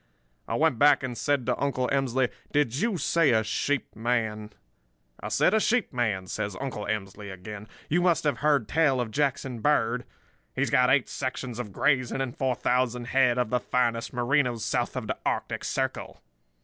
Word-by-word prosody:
"I -, -, -2 dB
went 120 Hz, -, +2 dB
back 145 Hz, -1 st, +5 dB
and 125 Hz, -2 st, -3 dB
said 140 Hz, -1 st, 0 dB
to 125 Hz, -1 st, -1 dB
Uncle 130 Hz, -3 st, 0 dB
Emsley: 130 Hz, -2 st, +1 dB, 0.2 s
'Did 145 Hz, -5 st, +1 dB
you 215 Hz, +3 st, 0 dB
say 165 Hz, -1 st, +2 dB
a 110 Hz, -1 st, +3 dB
sheep 140 Hz, +5 st, -2 dB
man?' 110 Hz, -2 st, -1 dB, 0.7 s
"'I -, -, -6 dB
said 105 Hz, -, +2 dB
a 220 Hz, -, +4 dB
sheep 240 Hz, -, +1 dB
man,' 110 Hz, -6 st, -1 dB
says 100 Hz, 0 st, -4 dB
Uncle 125 Hz, -7 st, -4 dB
Emsley 105 Hz, -1 st, -4 dB
again. 105 Hz, +3 st, -9 dB, 0.2 s
'You 175 Hz, +4 st, +2 dB
must 175 Hz, -2 st, +2 dB
have 145 Hz, -5 st, 0 dB
heard 145 Hz, -7 st, +2 dB
tell 150 Hz, -2 st, +2 dB
of 120 Hz, -3 st, -2 dB
Jackson 135 Hz, -2 st, -1 dB
Bird. 125 Hz, -2 st, +1 dB, 0.5 s
He's 140 Hz, +1 st, 0 dB
got 125 Hz, 0 st, +4 dB
eight 135 Hz, -1 st, +3 dB
sections 130 Hz, -2 st, -4 dB
of 110 Hz, -5 st, -5 dB
grazing 130 Hz, +3 st, +1 dB
and 135 Hz, -1 st, -3 dB
four 130 Hz, -5 st, 0 dB
thousand 125 Hz, 0 st, 0 dB
head 125 Hz, -2 st, +3 dB
of 125 Hz, -3 st, 0 dB
the 125 Hz, -, +2 dB
finest 120 Hz, -2 st, 0 dB
Merinos 125 Hz, -2 st, +1 dB
south -, -, -1 dB
of -, -, -3 dB
the -, -, -4 dB
Arctic -, -, -2 dB
Circle. -, -, -3 dB
125 Hz, 180 wpm, -27 LUFS, 115-140 Hz, 0.7 s, back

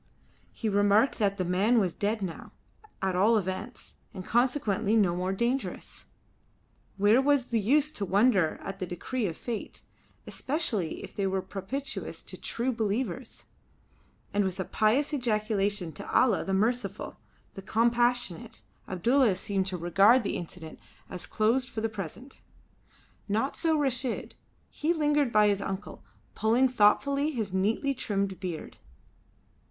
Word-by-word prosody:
He 225 Hz, -, -4 dB
remarked 205 Hz, +4 st, +3 dB
that 200 Hz, -2 st, +1 dB
the 185 Hz, -, -1 dB
man 195 Hz, +7 st, +2 dB
was 185 Hz, -6 st, +2 dB
dead 210 Hz, +1 st, -1 dB
now 175 Hz, -4 st, -6 dB, 0.5 s
at 190 Hz, -1 st, 0 dB
all 215 Hz, +5 st, +4 dB
events, 190 Hz, +1 st, -5 dB, 0.2 s
and 185 Hz, -1 st, -7 dB
consequently 230 Hz, -4 st, +1 dB
no 190 Hz, -6 st, +3 dB
more 180 Hz, +1 st, -1 dB
dangerous. 235 Hz, +7 st, -3 dB, 0.9 s
Where 210 Hz, +6 st, +5 dB
was 275 Hz, -3 st, +2 dB
the 230 Hz, -, +2 dB
use 290 Hz, +8 st, +2 dB
to 205 Hz, -9 st, -3 dB
wonder 195 Hz, -3 st, +3 dB
at 195 Hz, 0 st, -6 dB
the 185 Hz, -, -3 dB
decrees 205 Hz, +5 st, -3 dB
of 165 Hz, -, -7 dB
Fate, 235 Hz, -3 st, -6 dB, 0.4 s
especially 235 Hz, -, -2 dB
if -, -, -9 dB
they 200 Hz, -1 st, -1 dB
were 190 Hz, 0 st, -1 dB
propitious 265 Hz, +9 st, -5 dB
to -, -, -9 dB
the -, -, -16 dB
True 245 Hz, +3 st, -1 dB
Believers? 225 Hz, +1 st, -3 dB, 0.9 s
And 205 Hz, 0 st, +2 dB
with 190 Hz, 0 st, -3 dB
a 190 Hz, -, -1 dB
pious 250 Hz, -, +1 dB
ejaculation 210 Hz, -, 0 dB
to 150 Hz, -, -8 dB
Allah 245 Hz, -6 st, +3 dB
the 195 Hz, -, -4 dB
Merciful, 225 Hz, +6 st, -1 dB, 0.4 s
the 195 Hz, -, -8 dB
Compassionate, 235 Hz, -2 st, +1 dB, 0.2 s
Abdulla 230 Hz, +4 st, +2 dB
seemed 190 Hz, 0 st, -1 dB
to 185 Hz, -1 st, -3 dB
regard 195 Hz, +8 st, +4 dB
the 200 Hz, -, -2 dB
incident 165 Hz, -2 st, -7 dB, 0.3 s
as 180 Hz, -, -5 dB
closed 245 Hz, +4 st, +1 dB
for 220 Hz, -, -4 dB
the 225 Hz, -, +1 dB
present. 215 Hz, -, -8 dB, 0.9 s
Not 225 Hz, +7 st, 0 dB
so 320 Hz, -2 st, +2 dB
Reshid. 260 Hz, -3 st, 0 dB, 0.4 s
He 315 Hz, +3 st, 0 dB
lingered 295 Hz, -4 st, +2 dB
by 210 Hz, -1 st, +5 dB
his 200 Hz, -1 st, +1 dB
uncle, 195 Hz, +1 st, -6 dB, 0.3 s
pulling 235 Hz, +4 st, +3 dB
thoughtfully 275 Hz, +6 st, +3 dB
his 220 Hz, -10 st, -3 dB
neatly 220 Hz, +9 st, +1 dB
trimmed 200 Hz, -6 st, -2 dB
beard. 180 Hz, -4 st, -6 dB
215 Hz, 145 wpm, -28 LUFS, 190-250 Hz, 0.9 s, Where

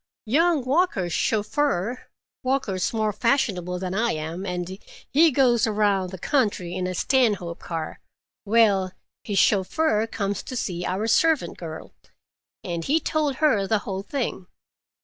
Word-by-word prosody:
Young 305 Hz, +3 st, +2 dB
Walker's 260 Hz, -, +1 dB
chauffeur—Walker's 235 Hz, -2 st, -1 dB
more 215 Hz, -2 st, 0 dB
fashionable 195 Hz, -9 st, 0 dB
than 185 Hz, 0 st, -4 dB
I 230 Hz, +4 st, +1 dB
am, 160 Hz, +5 st, -5 dB
and 180 Hz, +1 st, -4 dB, 0.3 s
he 320 Hz, +4 st, +6 dB
goes 245 Hz, -5 st, +3 dB
around 205 Hz, -3 st, +1 dB
the 190 Hz, -, -7 dB
country 200 Hz, -, 0 dB
in 185 Hz, 0 st, -2 dB
a 185 Hz, -, -3 dB
Stanhope 205 Hz, -9 st, +1 dB
car—well, 195 Hz, +4 st, -1 dB, 0.3 s
his 205 Hz, -2 st, -3 dB
chauffeur 215 Hz, -, +2 dB
comes 200 Hz, -3 st, -2 dB
to 255 Hz, -, -7 dB
see 180 Hz, -7 st, -3 dB
our 190 Hz, +4 st, -1 dB
servant 315 Hz, +6 st, +2 dB
girl, 160 Hz, -2 st, -8 dB, 0.7 s
and 170 Hz, -1 st, -3 dB
he 305 Hz, -, +2 dB
told 305 Hz, -4 st, 0 dB
her 255 Hz, -10 st, +2 dB
the 220 Hz, -, +2 dB
whole 195 Hz, -3 st, -3 dB
thing. 220 Hz, -5 st, -4 dB
210 Hz, 130 wpm, -24 LUFS, 185-260 Hz, 0.7 s, he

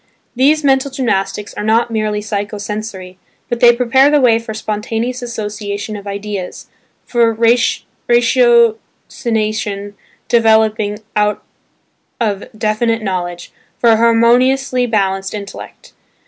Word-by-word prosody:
These 295 Hz, +5 st, +3 dB
mental 270 Hz, 0 st, +2 dB
gymnastics 205 Hz, -6 st, -2 dB
are -, -, -5 dB
not 225 Hz, +2 st, +1 dB
merely 215 Hz, -1 st, -1 dB
psycho 205 Hz, 0 st, -4 dB
sensory, 205 Hz, -3 st, -6 dB, 0.3 s
but 240 Hz, -, -2 dB
they 240 Hz, 0 st, +7 dB
prepare 250 Hz, +3 st, +3 dB
the 295 Hz, 0 st, +3 dB
way 235 Hz, -4 st, +4 dB
for 230 Hz, -1 st, -8 dB
spontaneous 220 Hz, +3 st, -3 dB
association 210 Hz, -3 st, -5 dB
of 205 Hz, -1 st, -9 dB
ideas, 200 Hz, -2 st, -5 dB, 0.4 s
for 235 Hz, -2 st, +2 dB, 0.8 s
ratiocination 225 Hz, -3 st, +1 dB, 0.3 s
developing 220 Hz, -2 st, +2 dB, 0.2 s
out 210 Hz, 0 st, 0 dB, 0.8 s
of 205 Hz, -4 st, -1 dB
definite 225 Hz, +1 st, 0 dB
knowledge, 175 Hz, -3 st, -4 dB, 0.3 s
for 235 Hz, -, +4 dB
a 220 Hz, -, +4 dB
harmoniously 245 Hz, +3 st, +3 dB
balanced 195 Hz, -3 st, -1 dB
intellect. 200 Hz, -1 st, -10 dB
220 Hz, 110 wpm, -16 LUFS, 205-240 Hz, 0.8 s, they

